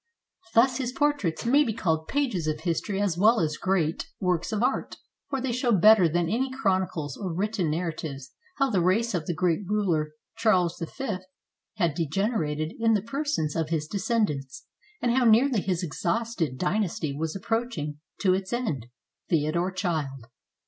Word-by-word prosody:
Thus 250 +3 +5
his 255 -3 -2
portraits 290 - 0
may 280 +5 +5
be 225 -6 -2
called 160 -7 0
pages 245 - 0
of 155 0 -2
history 185 +4 -1
as 190 -4 0
well 225 +4 +5
as 155 -3 0
great 180 -4 0
S19 - - -3
SPAIN - - -27
works 180 0 0
of 215 +1 0
art, 265 - 0 0.3
for 275 - -1
they 260 -1 -1
show 245 0 +1
better 205 -3 +6
than 170 +1 +1
any 250 +9 0
chronicles 185 - -1
or 190 -3 -4
written 195 0 -1
narratives 155 -4 -4 0.3
how 275 -2 +2
the 190 -4 +2
race 205 +7 +2
of 165 -4 -2
the 175 - -1
great 170 0 +1
ruler 175 -7 0 0.2
Charles 180 -6 +2
V 215 - -3 0.6
had 170 -7 +1
degenerated 160 - -1
in 225 -1 +4
the 200 - 0
persons 250 - -2
of 160 -1 -1
his 160 -2 -1
descendants, 185 - -1 0.4
and 240 - +3
how 260 - +3
nearly 235 0 +4
his 180 -2 -1
exhausted 180 - -1
dynasty 180 -5 -1
was 160 +3 -3
approaching 195 - -2 0.2
to 185 -3 +4
its 190 +1 -2
end. 190 - -2 0.4
Theodore 170 +3 +1
Child. 155 - -2
185 Hz, 170 wpm, -27 LUFS, 160-225 Hz, 0.6 s, better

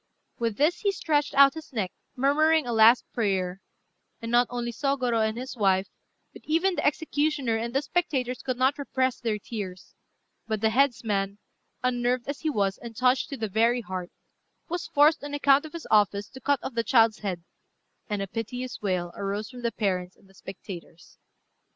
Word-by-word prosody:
] - - -45
With 230 -3 -1
this 305 +5 +2
he 405 - +1
stretched 295 -7 0
out 275 -1 +7
his 320 -1 -10
neck, 205 -8 -2 0.2
murmuring 305 +3 +3
a 240 - -2
last 225 +2 +6
prayer; 190 -4 -1 0.6
and 230 0 -5
not 245 +1 +4
only 240 -1 -3
Sôgorô 250 -3 0
and 220 - -6
his 260 +2 -6
wife, 195 -3 +2 0.4
but - - -12
even 335 +5 +2
the - - -2
executioner 290 -4 0
and 230 +1 -2
the 275 - +2
spectators 270 -7 -1
could 255 -2 -3
not 260 +3 +2
repress 260 -2 -1
their 225 -3 -1
tears; 195 -4 -7 0.5
but 220 -1 -1
the 220 +1 +2
headsman, 215 -6 +1 0.5
unnerved 245 0 0
as 285 0 -4
he 315 - -1
was, 200 -8 0
and 235 -1 -9
touched 255 +5 +2
to 275 - -5
the 220 - -2
very 230 +4 +2
heart, 185 -3 -5 0.6
was 350 +1 -4
forced, 300 +1 +4
on 290 0 -4
account 285 +1 +4
of 310 - -16
his 335 - -7
office, 205 -1 +3
to 265 - -12
cut 285 +1 +2
off 265 - -5
the 230 0 0
child's 225 -3 +4
head, 185 -5 -4 0.7
and 205 -1 -1
a - - -5
piteous 245 +5 -5
wail 180 -4 -1
arose 200 +3 -3
from 250 -1 -10
the 235 -1 0
parents 185 -4 -2
and 195 - -24
the 195 - -22
spectators. 180 -3 -11
240 Hz, 190 wpm, -27 LUFS, 205-280 Hz, 0.7 s, out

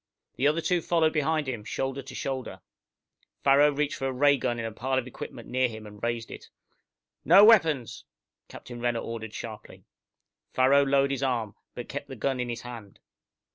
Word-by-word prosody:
The 135 - +2
other 155 +3 +1
two 175 +1 +1
followed 160 -1 +2
behind 155 0 0
him, 120 -5 -4
shoulder 135 +4 -3
to 135 -1 -11
shoulder. 130 -1 -4 0.8
Farrow 140 +2 +6
reached 145 0 -1
for 135 - -2
a - - -1
ray 140 +2 +4
gun 120 -3 -2
in 115 - -4
a 115 - -4
pile 130 +4 -2
of 130 - -1
equipment 125 - -9
near 130 0 +1
him, 110 -2 -9
and 105 -1 -12
raised 115 -1 -3
it. - - -10 0.7
"No 195 +5 +8
weapons!" 160 - +3 0.4
Captain 120 -1 -10
Renner 120 -1 0
ordered 110 -2 -6
sharply. 110 -2 -9 0.7
Farrow 135 +2 +4
lowered 140 0 +2
his 135 -1 -2
arm, 120 -6 -1 0.2
but - - -6
kept - - -6
the - - -8
gun 135 -2 -1
in 125 -1 -2
his 120 0 -4
hand. 115 -5 -10
130 Hz, 185 wpm, -27 LUFS, 120-140 Hz, 0.8 s, No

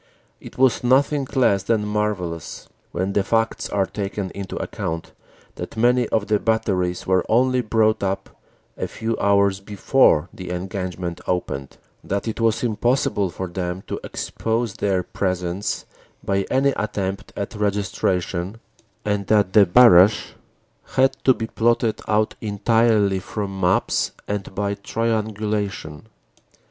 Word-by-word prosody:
It - - -12
was 130 -2 +3
nothing 135 +2 +3
less 100 -7 +3
than 105 +2 0
marvellous 105 -6 -3 0.2
when 95 +3 -2
the 100 - +2
facts 115 +2 0
are 100 -1 +1
taken 100 -1 -4
into 100 -1 -6
account 80 0 -4 0.5
that - - -7
many 120 +1 +3
of 110 -2 +1
the 105 -1 +1
batteries 95 -5 0
were 95 -1 +2
only 130 +2 +3
brought 110 -1 +2
up 95 0 -2 0.4
a - - -3
few 115 0 -3
hours 100 -1 +3
before 100 - +3
the 90 -1 -8
engagement 90 -1 -4
opened, 70 -7 -3 0.3
that 100 +3 -2
it 110 +1 -3
was 115 +1 +2
impossible 120 -3 +1
for 95 +2 -5
them 90 +1 -4
to - - -4
expose 115 -1 -2
their 100 -4 0
presence 90 +1 -2 0.4
by 100 -1 0
any 135 +1 +3
attempt 100 -3 -3
at 100 - -4
registration, 95 -2 -1 0.5
and 105 -2 -1
that 105 -3 +3
the 105 -3 +7
barrage 100 -1 +6 0.6
had 135 0 +4
to 130 - +6
be 115 - -3
plotted 115 0 +1
out 110 0 +2
entirely 105 -1 +2
from 95 0 -5
maps 90 -9 +1
and 100 -2 -4
by 100 0 -1
triangulation. 105 -5 -2
100 Hz, 135 wpm, -22 LUFS, 95-115 Hz, 0.6 s, the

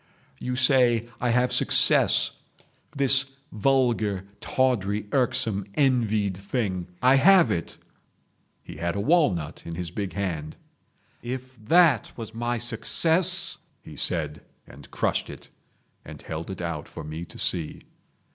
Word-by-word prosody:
You 125 0 -3
say, 125 -3 +3
I 125 - -1
have 125 +1 +2
success—this 135 -3 +2 0.3
vulgar, 110 -5 0
tawdry, 105 -6 0
irksome, 110 -6 0
envied 110 -8 +1
thing. 95 -2 -3 0.2
I 130 +1 +6
have 185 +4 +5
it." 85 - -4 0.9
He - - -11
had 85 +2 -3
a - - -2
walnut 100 - +1
in 85 - -7
his 90 -1 -6
big 95 -2 -5
hand. 80 -6 -4 0.6
"If 130 +1 -7
that 165 - +4
was 115 -2 -8
my 120 +1 -2
success," 165 +10 0 0.2
he - - -12
said, 75 -4 -1 0.2
and - - -15
crushed - - -1
it, - - -12 0.5
and - - -11
held 80 +2 -7
it 95 -2 -6
out 80 -3 -5
for - - -9
me 80 +2 -7
to - - -13
see. 80 -4 -1
115 Hz, 130 wpm, -25 LUFS, 90-130 Hz, 0.9 s, I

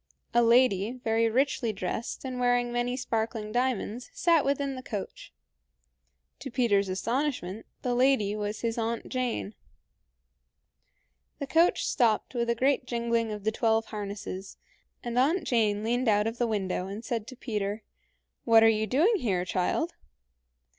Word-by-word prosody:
A 240 - +5
lady, 230 -3 +4
very 225 0 +2
richly 250 -1 +1
dressed 195 +6 -4
and 255 -1 -4
wearing 245 -1 +2
many 240 +1 -1
sparkling 225 -3 -2
diamonds, 245 -1 -1
sat 335 -4 +3
within 280 0 0
the 255 - -6
coach. 210 -6 -6 1.1
To 270 - -6
Peter's 215 -6 +2
astonishment, 225 -1 -2 0.2
the 250 - 0
lady 245 -5 +3
was 210 0 -4
his 230 0 -1
Aunt 230 0 -2
Jane. 250 -5 -2 1.8
The 280 - -4
coach 330 +5 +3
stopped 235 -3 +1
with 235 -1 -1
a 235 - +2
great 260 +1 +1
jingling 235 -2 0
of 210 -1 -6
the 220 - +1
twelve 225 0 +1
harnesses, 200 -2 -6 0.5
and 240 0 -1
Aunt 320 +7 +2
Jane 215 -6 +1
leaned 240 +3 0
out 210 -1 +3
of 225 +1 -3
the 240 - +2
window, 190 -4 -2
and 205 +4 -7
said 230 -3 -3
to 255 - -9
Peter, 210 -4 -3 0.6
"What 225 -1 +6
are - - +7
you 220 -1 +2
doing 340 - +3
here, 190 - -1
child?" 190 - -1
230 Hz, 150 wpm, -28 LUFS, 210-255 Hz, 1.8 s, are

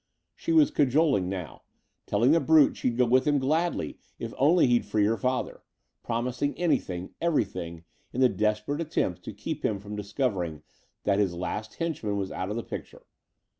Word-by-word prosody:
She 335 - -3
was 315 -3 +5
cajoling 140 - +2
now 90 -5 -6 0.5
telling 115 +6 +3
the 165 - +5
brute 160 -3 +5
she'd 120 -2 -1
go 125 - +4
with 130 +3 +3
him 145 -1 +4
gladly 160 +6 0 0.2
if - - -6
only 165 +6 +5
he'd 120 -2 +3
free 105 0 +1
her 110 +2 +2
father; 130 +1 -2 0.4
promising 125 +4 -2
anything, 95 - -1
everything, 95 - -1 0.3
in 125 - -4
the 130 - +6
desperate 105 +7 -1
attempt 95 - -1
to - - -5
keep - - -5
him 100 - 0
from 105 +1 -7
discovering 100 - -2 0.4
that 100 0 +2
his 95 -4 +1
last 105 +5 -4
henchman 140 -12 -2
was 95 -1 -3
out 95 +1 -3
of 105 - -3
the 115 - -3
picture. - - -8
115 Hz, 170 wpm, -27 LUFS, 100-145 Hz, 0.5 s, the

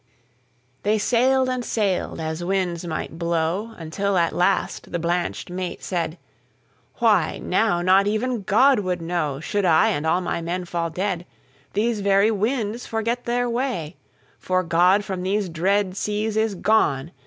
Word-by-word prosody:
'"They 210 +2 +2
sailed 255 +4 +2
and 255 -1 -2
sailed, 205 -6 -1
as 160 +1 -3
winds 180 -2 -1
might 160 0 -5
blow, 170 +6 -1
Until 190 +4 -1
at 170 -1 +2
last 180 +2 0
the - - -1
blanched 175 +1 -2
mate 180 -1 -5
said:"Why, 170 -2 -2
now 190 -6 +1
not 190 +2 +4
even 225 +2 -1
God 240 +7 +4
would 185 -3 -1
knowShould 165 +2 -2
I 160 -3 +4
and 145 +2 -1
all 175 +3 +2
my 175 - -2
men 175 +2 -3
fall 170 -1 -2
dead. 180 +1 -2 0.5
These 220 +2 0
very 200 +2 +4
winds 225 +1 -1
forget 230 +2 -2
their 245 +1 0
way, 235 - -2 0.4
For 185 0 0
God 180 +4 +3
from 190 -2 -4
these 195 +1 -1
dread 185 +3 0
seas 210 +1 -2
is 220 -2 +1
gone. 165 -8 +1
190 Hz, 145 wpm, -23 LUFS, 170-215 Hz, 0.5 s, not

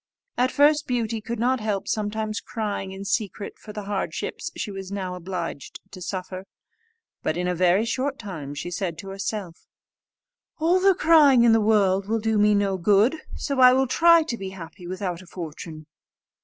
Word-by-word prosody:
At 255 +1 +1
first 295 +1 +3
Beauty 230 -3 -1
could 235 +2 -4
not 250 +3 +1
help 210 -3 -2
sometimes 215 0 -2
crying 205 -4 -4
in 195 +1 -8
secret 200 0 -3
for 215 - -10
the 210 0 -6
hardships 200 -1 -3
she 210 - -4
was 195 -1 -7
now 190 -2 -3
obliged 175 -5 -6
to 185 - -10
suffer; 185 +1 -5 0.7
but 155 - -1
in 180 0 -1
a 180 - +1
very 180 +4 +3
short 265 +4 -2
time 160 -10 -7
she 175 +5 -5
said 175 -2 -3
to 195 - -8
herself, 195 -2 -5 0.9
"All 340 +4 +3
the 385 0 +4
crying 300 -8 +6
in 235 - +6
the 225 - +4
world 200 -3 +2
will 225 +1 0
do 220 -1 +1
me 210 0 +4
no 200 -1 +1
good, 205 - +3 0.2
so 280 -2 -3
I 255 0 +8
will 265 +1 +3
try 335 +5 +5
to 245 -7 -4
be 195 -1 -5
happy 180 -1 -10
without 185 -1 -4
a 185 - -16
fortune." 160 -2 -8
205 Hz, 185 wpm, -24 LUFS, 185-235 Hz, 0.9 s, I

